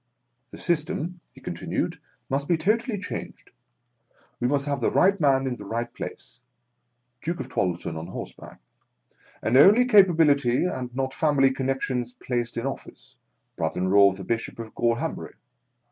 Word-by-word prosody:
" -, -, -49 dB
The -, -, -11 dB
system," 175 Hz, +1 st, -2 dB, 0.2 s
he -, -, -15 dB
con -, -, -5 dB
tinued, -, -, -3 dB, 0.3 s
"must 140 Hz, +1 st, -1 dB
be 170 Hz, -, +2 dB
totally 215 Hz, +6 st, 0 dB
changed. 205 Hz, -, -7 dB, 0.9 s
We 125 Hz, -, +1 dB
must 140 Hz, +1 st, 0 dB
have 145 Hz, -1 st, -2 dB
the -, -, +2 dB
right 195 Hz, +2 st, +3 dB
man 135 Hz, -2 st, +3 dB
in 125 Hz, -2 st, -2 dB
the -, -, -9 dB
right 115 Hz, +3 st, -3 dB
place 120 Hz, -, -8 dB, 0.8 s
(Duke 170 Hz, +2 st, -3 dB
of 130 Hz, 0 st, -5 dB
Twaddleton 85 Hz, -7 st, -2 dB
on 80 Hz, -, -7 dB
horseback), -, -, -9 dB, 0.8 s
and 115 Hz, -, +1 dB
only 205 Hz, -, +7 dB
capa 200 Hz, -8 st, +6 dB
bility 140 Hz, -3 st, +3 dB
and 130 Hz, -7 st, -4 dB
not 130 Hz, 0 st, -2 dB
family 140 Hz, -4 st, +3 dB
connexions 130 Hz, -2 st, -2 dB
placed 120 Hz, -2 st, -3 dB
in 115 Hz, -, -2 dB
office 135 Hz, -, -7 dB, 0.4 s
(brother 80 Hz, +2 st, -2 dB
in 95 Hz, +1 st, 0 dB
law 100 Hz, 0 st, +7 dB
of 95 Hz, -, -6 dB
the 95 Hz, -, -7 dB
Bishop 115 Hz, +4 st, -3 dB
of 115 Hz, -1 st, -8 dB
Gor 115 Hz, -1 st, +1 dB
hambury). 160 Hz, +6 st, -5 dB
135 Hz, 170 wpm, -25 LUFS, 120-160 Hz, 0.9 s, only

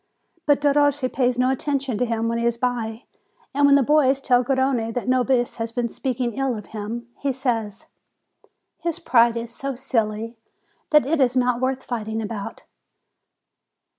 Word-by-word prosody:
But 290 Hz, -1 st, +4 dB
Derossi 290 Hz, -2 st, +2 dB
pays 250 Hz, -2 st, +1 dB
no 255 Hz, +1 st, +3 dB
attention 270 Hz, -4 st, -1 dB
to 250 Hz, -, +2 dB
him 230 Hz, 0 st, -1 dB
when 230 Hz, 0 st, -1 dB
he 235 Hz, -, -1 dB
is 235 Hz, 0 st, 0 dB
by; 235 Hz, -1 st, -2 dB, 0.5 s
and 285 Hz, +1 st, +4 dB
when 280 Hz, -, +6 dB
the 280 Hz, -, +4 dB
boys 275 Hz, -1 st, +3 dB
tell 250 Hz, -2 st, +3 dB
Garrone 260 Hz, -3 st, 0 dB
that 245 Hz, -, -3 dB
Nobis 255 Hz, -1 st, +1 dB
had 230 Hz, 0 st, -4 dB
been 240 Hz, -1 st, 0 dB
speaking 245 Hz, -1 st, -2 dB
ill 265 Hz, -4 st, 0 dB
of 210 Hz, -, -8 dB
him, 225 Hz, +3 st, -5 dB
he 280 Hz, -, 0 dB
says: 230 Hz, -6 st, -2 dB, 0.9 s
"His 340 Hz, -2 st, -2 dB
pride 235 Hz, -1 st, +3 dB
is 230 Hz, 0 st, -5 dB
so 275 Hz, +2 st, -4 dB
silly 230 Hz, -3 st, -2 dB, 0.5 s
that 300 Hz, -3 st, +5 dB
it 300 Hz, +1 st, +1 dB
is 255 Hz, 0 st, +3 dB
not 250 Hz, -1 st, +1 dB
worth 260 Hz, 0 st, -1 dB
fighting 220 Hz, -2 st, -3 dB
about." 215 Hz, -2 st, -6 dB
250 Hz, 165 wpm, -23 LUFS, 230-270 Hz, 0.9 s, when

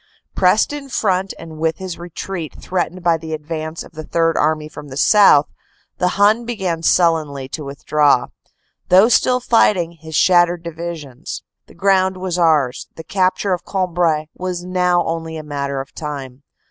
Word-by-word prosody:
Pressed 195 Hz, +9 st, +3 dB
in 285 Hz, -2 st, -7 dB
front 195 Hz, -6 st, 0 dB
and 160 Hz, -2 st, -10 dB
with 160 Hz, 0 st, 0 dB
his 185 Hz, -3 st, -6 dB
retreat 175 Hz, -1 st, -6 dB
threatened 180 Hz, 0 st, -3 dB
by 170 Hz, -2 st, +3 dB
the 160 Hz, 0 st, -7 dB
advance 155 Hz, +1 st, -5 dB
of -, -, -15 dB
the 155 Hz, -1 st, -8 dB
Third 165 Hz, +1 st, +1 dB
Army 155 Hz, 0 st, +1 dB
from 150 Hz, -1 st, -10 dB
the 135 Hz, -1 st, -8 dB
south, 175 Hz, -3 st, +6 dB, 0.5 s
the 180 Hz, -, +2 dB
Hun 210 Hz, +4 st, +4 dB
began 190 Hz, -8 st, -3 dB
sullenly 160 Hz, -6 st, +1 dB
to 150 Hz, -, -5 dB
withdraw, 140 Hz, -1 st, +2 dB, 0.6 s
though 190 Hz, +5 st, +6 dB
still 250 Hz, +1 st, +3 dB
fighting, 205 Hz, -8 st, +2 dB
his 160 Hz, -1 st, -10 dB
shattered 175 Hz, -1 st, +4 dB
divisions. 165 Hz, -5 st, -7 dB, 0.2 s
The -, -, -18 dB
ground 190 Hz, 0 st, +2 dB
was 185 Hz, -1 st, -3 dB
ours; 150 Hz, -7 st, +2 dB
the 160 Hz, -, -9 dB
capture 185 Hz, +2 st, 0 dB
of 180 Hz, -, -3 dB
Cambrai 175 Hz, -5 st, 0 dB
was 180 Hz, -1 st, -4 dB
now 180 Hz, -1 st, +1 dB
only 165 Hz, -1 st, -4 dB
a 155 Hz, -, -7 dB
matter 140 Hz, -2 st, -3 dB
of 135 Hz, 0 st, -8 dB
time. 140 Hz, -4 st, -7 dB
170 Hz, 160 wpm, -19 LUFS, 155-185 Hz, 0.6 s, south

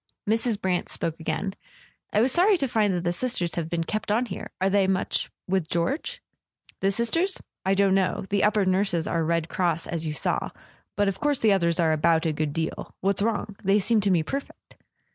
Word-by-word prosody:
Mrs. 225 Hz, 0 st, +1 dB
Brant 185 Hz, -3 st, -1 dB
spoke 165 Hz, 0 st, -2 dB
again. 165 Hz, +5 st, -2 dB, 0.6 s
"I 210 Hz, -, +3 dB
was 255 Hz, +3 st, +3 dB
sorry 375 Hz, -, +4 dB
to 275 Hz, -, 0 dB
find 215 Hz, -4 st, +2 dB
that 175 Hz, -, -2 dB
the 175 Hz, 0 st, 0 dB
Sisters 180 Hz, -5 st, 0 dB
have 165 Hz, -2 st, -3 dB
been 170 Hz, -1 st, -1 dB
kept 215 Hz, +4 st, -3 dB
on 235 Hz, +4 st, +2 dB
here. 200 Hz, -, -7 dB
Are 190 Hz, -, +2 dB
they 195 Hz, 0 st, +3 dB
much 190 Hz, -1 st, 0 dB, 0.2 s
with 185 Hz, -4 st, 0 dB
George? 170 Hz, -, -2 dB, 0.3 s
" -, -, -29 dB
"The 195 Hz, -, +3 dB
Sisters? 330 Hz, -, +1 dB, 0.3 s
I 195 Hz, -, +3 dB
don't 195 Hz, -1 st, +3 dB
know. 190 Hz, -1 st, +1 dB
The 200 Hz, -1 st, +2 dB
upper 210 Hz, -1 st, +3 dB
nurses 185 Hz, -3 st, +1 dB
are 165 Hz, -1 st, 0 dB
Red 165 Hz, 0 st, 0 dB
Cross, 170 Hz, -3 st, 0 dB
as 165 Hz, -1 st, -2 dB
you 155 Hz, -, -2 dB
saw. 150 Hz, -, -1 dB, 0.5 s
But 205 Hz, 0 st, +2 dB
of 195 Hz, -1 st, -2 dB
course 290 Hz, -1 st, +1 dB
the 220 Hz, -4 st, +3 dB
others 170 Hz, -2 st, +1 dB
are 160 Hz, -2 st, +3 dB
about 165 Hz, +1 st, +2 dB
a 160 Hz, -, +1 dB
good 150 Hz, 0 st, -2 dB
deal. 160 Hz, +2 st, -4 dB
What's 195 Hz, +1 st, +1 dB
wrong? 215 Hz, -1 st, -1 dB
They 195 Hz, +1 st, +4 dB
seem 215 Hz, +2 st, +2 dB
to 200 Hz, -, +1 dB
me 175 Hz, -4 st, +3 dB
perfect." 275 Hz, -, -7 dB
190 Hz, 215 wpm, -25 LUFS, 170-215 Hz, 0.6 s, sorry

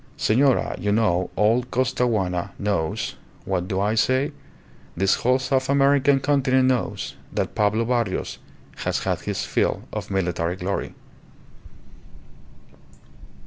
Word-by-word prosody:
Senora, 130 Hz, +4 st, +2 dB
you 105 Hz, -, 0 dB
know, 100 Hz, -5 st, +2 dB
all 110 Hz, +4 st, +3 dB
Costaguana 120 Hz, -8 st, -1 dB
knows 100 Hz, -6 st, -2 dB, 0.3 s
what 90 Hz, -2 st, -1 dB
do 95 Hz, -1 st, -1 dB
I 105 Hz, +2 st, +1 dB
say? 130 Hz, +5 st, +2 dB, 0.7 s
this 95 Hz, +1 st, +3 dB
whole 125 Hz, +1 st, +2 dB
South 130 Hz, 0 st, 0 dB
American 140 Hz, 0 st, +4 dB
continent 130 Hz, -2 st, +2 dB
knows, 125 Hz, -2 st, -1 dB, 0.2 s
that -, -, -2 dB
Pablo 105 Hz, +2 st, +1 dB
Barrios 120 Hz, -5 st, -1 dB, 0.4 s
has -, -, -2 dB
had -, -, -1 dB
his -, -, -3 dB
fill -, -, 0 dB
of -, -, -5 dB
military 90 Hz, -2 st, -1 dB
glory." 95 Hz, +2 st, -3 dB
115 Hz, 115 wpm, -23 LUFS, 95-130 Hz, 0.7 s, American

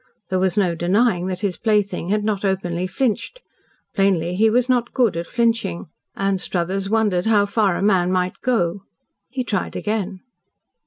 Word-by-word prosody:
There 185 Hz, -, 0 dB
was 185 Hz, 0 st, +1 dB
no 185 Hz, -4 st, +2 dB
denying 180 Hz, +2 st, +1 dB
that 185 Hz, +1 st, -3 dB
his 195 Hz, -5 st, -1 dB
plaything 205 Hz, -5 st, 0 dB
had 210 Hz, +1 st, +1 dB
not 210 Hz, -2 st, -1 dB
openly 185 Hz, -2 st, -1 dB
flinched. 260 Hz, -, -2 dB, 0.5 s
Plainly 180 Hz, -3 st, +1 dB
he 220 Hz, +3 st, +4 dB
was 245 Hz, +2 st, +2 dB
not 245 Hz, -2 st, +1 dB
good 240 Hz, -8 st, +2 dB
at 170 Hz, 0 st, -4 dB
flinching. 230 Hz, -8 st, 0 dB, 0.3 s
Anstruthers 195 Hz, 0 st, -1 dB
wondered 210 Hz, -4 st, +1 dB
how 210 Hz, -2 st, +4 dB
far 200 Hz, -3 st, +1 dB
a -, -, -2 dB
man 185 Hz, -3 st, +3 dB
might 185 Hz, 0 st, -1 dB
go. 200 Hz, -7 st, 0 dB, 0.5 s
He 255 Hz, +1 st, -3 dB
tried 205 Hz, -6 st, -2 dB
again. 205 Hz, -3 st, -3 dB
195 Hz, 160 wpm, -21 LUFS, 180-220 Hz, 0.5 s, he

